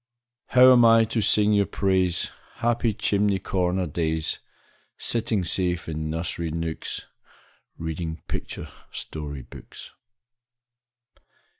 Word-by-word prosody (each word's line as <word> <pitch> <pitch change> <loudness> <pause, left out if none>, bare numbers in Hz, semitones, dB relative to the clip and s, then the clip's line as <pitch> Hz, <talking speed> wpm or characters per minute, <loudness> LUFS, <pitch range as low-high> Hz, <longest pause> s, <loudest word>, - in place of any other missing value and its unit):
How 130 0 +7
am 120 -2 +7
I 115 0 +7
to 115 0 -1
sing 105 0 +4
your 100 -1 +3
praise, 95 -3 +1 0.2
Happy 120 -1 +1
chimney 100 -2 +1
corner 90 -1 0
days, 80 0 -1 0.6
Sitting 115 -4 0
safe 90 0 0
in 80 -1 -3
nursery 85 +1 -2
nooks, 80 0 -4 0.7
Reading 80 0 -5
picture - - -5 0.2
story 75 -3 -6
books? - - -12
90 Hz, 105 wpm, -25 LUFS, 80-105 Hz, 0.7 s, How